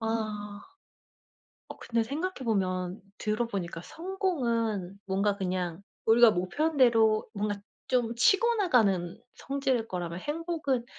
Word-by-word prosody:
아. 215 -2 -3 1.1
어 - - -8
근데 230 -1 0
생각해 310 +11 -3
보면 185 -3 -1 0.2
들어 215 +3 0
보니까 180 -6 -4
성공은 235 - -2
뭔가 200 +1 +1
그냥 180 -2 -2 0.2
우리가 230 +1 +7
목표한 290 - -1
대로 225 -4 +4
뭔가 205 -1 -2 0.3
좀 240 -3 +1
치고 405 - +4
나가는 205 - +2 0.2
성질일 270 -4 -1
거라면 175 -2 -4
행복은 300 -5 -2
225 Hz, 250 characters per minute, -29 LUFS, 195-270 Hz, 1.1 s, 우리가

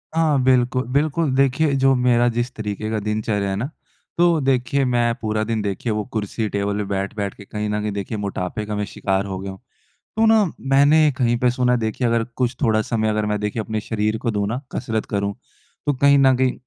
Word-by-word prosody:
हाँ, 155 -5 +3
बिल्कुल-बिल्कुल। 130 +4 +1
देखिए, 140 +2 +2
जो 135 0 +4
मेरा 120 -1 +3
जिस 120 +2 -1
तरीके 110 0 -4
की 110 -1 -1
दिनचर्या 105 -2 -1
है 95 - -1
ना, 110 +6 -2 0.5
तो 170 -2 +4
देखिए, 135 +1 +1
मैं 120 -1 +2
पूरा 110 -1 -1
दिन, 110 -2 0
देखिए, 100 +3 -2
वो 105 0 -1
कुर्सी-टेबल 105 -1 -2
पे 105 - -1
बैठ-बैठ 100 +1 -3
के 100 - -12
कहीं 105 0 -4
न 105 0 -1
कहीं 105 0 -2
देखिए, 105 +3 -4
मोटापे 100 +1 -3
का 105 - -4
मैं 105 0 -1
शिकार 95 0 -1
हो 95 -1 -4
गया 95 0 -5
हूँ। 95 - -11 0.6
तो 225 0 +4
ना, 220 -1 +5 0.2
मैंने 145 +3 +4
कहीं 120 -2 +2
पे 125 +1 +3
सुना 125 0 +1
है 125 - +2
देखिए, 110 +2 -1
अगर 115 -1 +1
कुछ 125 0 0
थोड़ा 110 -3 +3
समय 110 -1 -1
अगर 105 0 0
मैं 105 0 0
देखिए, 105 +2 -2
अपने 110 0 -3
शरीर 110 0 -1
को 115 - +2
दूँ 100 -1 -1
ना, 120 +3 -2
कसरत 115 -3 -2
करूँ, 100 0 -1 0.5
तो 145 - +3
कहीं 140 +2 +4
न 135 -1 +5
कहीं 130 -1 +2
115 Hz, 210 wpm, -21 LUFS, 105-130 Hz, 0.6 s, ना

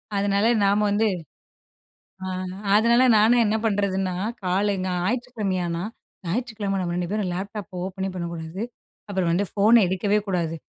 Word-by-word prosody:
அதனால 200 +1 +1 0.2
நாம 200 +1 +3
வந்து 215 +2 +2 1.2
ஆ - - -4 0.5
அதனால 235 +3 +5
நானும் 230 +3 +5
என்ன 215 0 +1
பண்ணுறதுன்னா, 195 -3 0 0.3
கால் 195 +3 +1
இங்க 185 0 -2
ஞாயிற்றுக்கிழமையானா 190 -6 -2 0.4
ஞாயிற்றுக்கிழமை 210 0 -2
நம்ம 175 -1 -2
2 175 -1 -2
பேரும் 210 -4 -1
லேப்டாப் 195 +2 -6
ஓப்பனே 190 +1 -3
பண்ணக்கூடாது. 170 +1 -5 0.5
அப்புறம் 190 -4 0
வந்து 185 +4 +1
ஃபோன 220 +3 +5
எடுக்கவே 200 +3 +1
கூடாது. 170 -3 -1
200 Hz, 130 wpm, -24 LUFS, 180-210 Hz, 1.2 s, அதனால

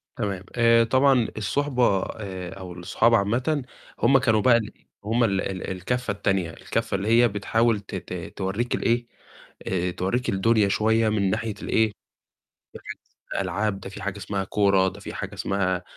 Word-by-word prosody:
تمام، 100 -6 -3
آآ 115 -1 +5
طبعًا 130 0 +3
الصُحبة 125 -1 +1
آآ، 95 -4 -6
أو 90 -2 -8
الصحاب 90 +6 +1
عامةً 125 +7 0 0.3
هم 135 +3 +5
كانوا 110 -5 +2
بقى 120 +1 +5
الإيه 110 -2 -7 0.2
هم 115 +3 +1
ال 95 -4 +1
ال 95 -1 -4
الكفّة 125 +7 -2
التانية، 95 -3 0
الكفّة 100 - -3
اللي 100 +2 -2
هي 120 +2 +5
بتحاول 110 +1 +1
ت 100 0 -9
ت 90 -2 -7
تورّيك 100 +6 -1
ال - - -4
إيه، 120 0 +1 0.6
آآ، 90 -1 0
تورّيك 95 +8 -1
الدنيا 105 +1 +3
شوية 110 +2 +2
من 100 -3 +1
ناحية 110 +2 -2
ال - - -6
إيه، 110 -1 +3 0.8
ناحية - - -8 0.4
الألعاب، 105 -1 -1
ده 95 - -8
في 100 +1 -9
حاجة 100 0 -3
اسمها 100 0 -3
كورة، 100 -1 +3
ده - - -5
في - - -8
حاجة - - -5
اسمها 95 -2 -1
105 Hz, 170 wpm, -25 LUFS, 95-115 Hz, 0.8 s, آآ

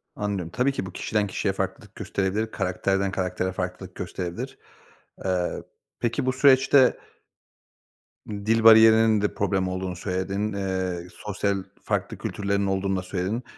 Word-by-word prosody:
Anlıyorum. 100 -5 -3
Tabii 125 +6 +1
ki 135 - -4
bu 95 - -7
kişiden 105 +3 -1
kişiye - - -1
farklılık - - -5
gösterebilir, 100 +3 -2
karakterden 95 +1 0
karaktere 90 0 -2
farklılık 90 0 -5
gösterebilir. 90 -1 -5 0.7
Eee, 90 -2 -1 0.4
peki 120 +3 -1
bu 130 - +1
süreçte 135 0 +5 1.3
dil 110 +2 0
bariyerinin 110 -1 +7
de 105 - 0
problem 95 -2 0
olduğunu 95 0 -3
söyledin, 95 +3 -2
eee, 95 -3 -2
sosyal 100 -1 -1 0.3
farklı - - -2
kültürlerin 100 0 -1
olduğunu 95 0 0
da - - -2
söyledin. 95 +6 -3
100 Hz, 130 wpm, -25 LUFS, 95-110 Hz, 1.3 s, bariyerinin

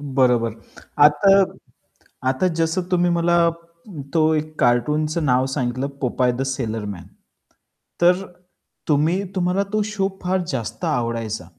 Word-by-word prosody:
बरोबर. 125 -5 +1 0.5
आता 150 +7 +5 1.0
आता 135 +8 +1
जसं 165 +3 +1
तुम्ही 175 -1 +2
मला 170 0 +2 0.8
तो 160 -1 +3
एक 155 0 -2
कार्टूनचं 150 +7 +1
नाव 130 -1 +2
सांगितलं 130 0 -2
"पोपाय 125 0 +1
द 120 - -4
सेलर 115 -5 -3
मॅन." 95 -4 -7 0.9
तर 180 +2 +4 0.7
तुम्ही 160 +5 +2
तुम्हाला 185 +2 +1
तो 215 - +2
शो 205 -2 -1
फार 185 +1 0
जास्त 145 +3 -4
आवडायचा. 115 - -2
150 Hz, 120 wpm, -21 LUFS, 125-175 Hz, 1.0 s, आता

